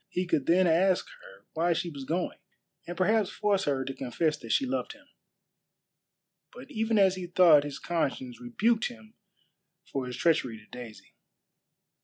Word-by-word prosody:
He 180 - -2
could 150 -6 0
then 185 +2 +4
ask 180 +3 +3
her - - -16
why 170 +2 +1
she 170 +1 -3
was 140 -3 -8
going, 175 +5 -2 0.5
and 175 - -6
perhaps 210 +1 +2
force 200 -2 0
her 135 -2 0
to 135 - -4
confess 150 +5 -1
that - - -8
she 275 - +2
loved 265 0 -3
him. 290 0 -20 1.5
But 265 +3 -12
even 225 -2 0
as 195 -2 +5
he 180 -1 -5
thought 170 -4 +6
his 145 -1 -6
conscience 135 -8 -3
rebuked 220 - +1
him 225 -2 -13 0.7
for 135 -6 -4
his 125 - -6
treachery 150 -9 +1
to 105 - -17
Daisy. 120 -2 -11
175 Hz, 165 wpm, -28 LUFS, 140-215 Hz, 1.5 s, thought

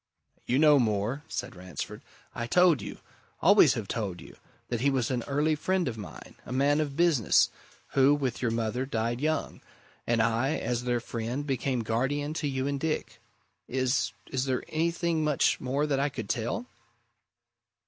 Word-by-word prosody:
"You 125 - +2
know 150 -1 +6
more," 110 +3 0
said - - -5
Ransford. 90 -4 -7 0.3
"I 120 - -4
told 175 - +4
you - - -7 0.4
always - - +6
have - - -4
told 95 -5 -3
you - - -12 0.3
that 120 -2 -2
he 140 - +3
was 130 -3 0
an 125 -2 0
early 150 +3 +1
friend 185 +3 0
of 120 - -2
mine, 105 -3 -10
a - - -10
man 140 +3 +2
of 145 -2 -3
business, 165 - +4 0.4
who, 135 +1 +4
with 130 -4 -2
your 120 - +1
mother, 115 +3 -1
died 115 0 -1
young, 155 +1 -1 0.5
and 120 -1 +2
I, 115 +6 +2
as 120 +1 -2
their 120 -1 0
friend, 120 +5 -4
became 130 -2 -1
guardian 135 +7 -1
to 150 - 0
you 130 -1 -2
and 140 0 -1
Dick. 120 -7 -3 0.5
Is 130 -2 0 0.2
is 130 -1 0
there 130 -2 -1
anything 165 0 0
much 150 -3 +2
more 135 +3 0
that 140 -3 0
I 140 +1 +1
could 115 -7 -6
tell?" 120 - -2
130 Hz, 170 wpm, -28 LUFS, 115-145 Hz, 0.5 s, know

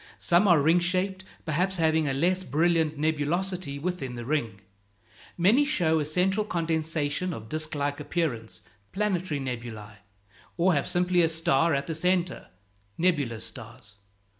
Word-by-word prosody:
Some 175 +4 +3
are 175 -4 +6
ring 160 +5 +4
shaped, 185 +2 -1 0.2
perhaps 180 +5 0
having 160 -2 +2
a 135 - 0
less 180 +6 +2
brilliant 160 +1 +1
nebulosity 160 +1 -1
within 145 -5 -4
the 120 -1 -6
ring. 115 -8 -2 0.8
Many 205 +11 +4
show 165 - +1
a 150 - -1
central 185 +7 +1
condensation 165 -2 -1
of 110 -5 -8
disk 155 +1 -2
like 145 0 -2
appearance 150 -8 -3 0.3
(planetary 185 -6 -1
nebulæ), 115 -5 -6 0.6
or 180 +2 +3
have 140 - 0
simply 180 0 +2
a 165 - +3
star 160 -1 +2
at 140 - -2
the 165 - -3
centre 180 +2 0 0.5
(nebulous 145 -10 0
stars). 115 -3 -11
160 Hz, 140 wpm, -27 LUFS, 140-180 Hz, 0.8 s, are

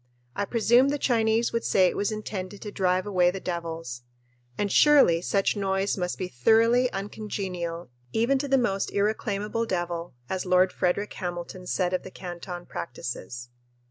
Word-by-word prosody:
I 205 - -1
presume 240 +4 +4
the 290 - 0
Chinese 230 -3 +2
would 230 - 0
say 190 - +4
it 180 - +1
was 205 +2 0
intended 205 -2 -5
to 210 - -6
drive 185 -1 +1
away 180 -3 +3
the 190 +2 -4
devils 165 -8 -5 0.6
and 205 -1 -1
surely 275 - +6
such 195 +3 +1
noise 195 0 0
must 180 -2 -2
be 185 - -3
"thoroughly 230 - +3
uncongenial 190 - -5 0.2
even 245 +5 +2
to 285 - -2
the 270 0 +3
most 195 -6 0
irreclaimable 210 +2 -1
devil," 175 - -3
as 185 +3 -2
Lord 185 0 +3
Frederick 185 +3 0
Hamilton 175 0 -6
said 180 -1 0
of 185 - 0
the - - -9
Canton 175 -1 -7
practices. 120 -5 -6
195 Hz, 160 wpm, -26 LUFS, 175-220 Hz, 0.6 s, surely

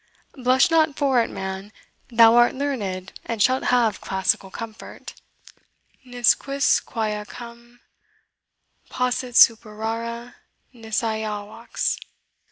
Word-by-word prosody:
Blush 260 +4 +2
not 315 -3 +3
for 270 -4 +3
it, - - -2
man 190 +2 -6 0.4
thou 230 -1 +6
art 240 +1 +4
learned, 205 -10 -4
and 230 -2 -5
shalt 255 +5 +2
have 240 -3 +2
classical 190 0 -1
comfort: 220 +2 -9 0.9
'Ne 245 -1 -11
quisquam 225 -5 +1
Ajacem 235 0 -12 1.1
possit 250 -1 -2
superare 230 +2 +2 0.4
nisi 225 -1 -3
Ajax.' 220 0 -3
235 Hz, 95 wpm, -23 LUFS, 215-250 Hz, 1.1 s, thou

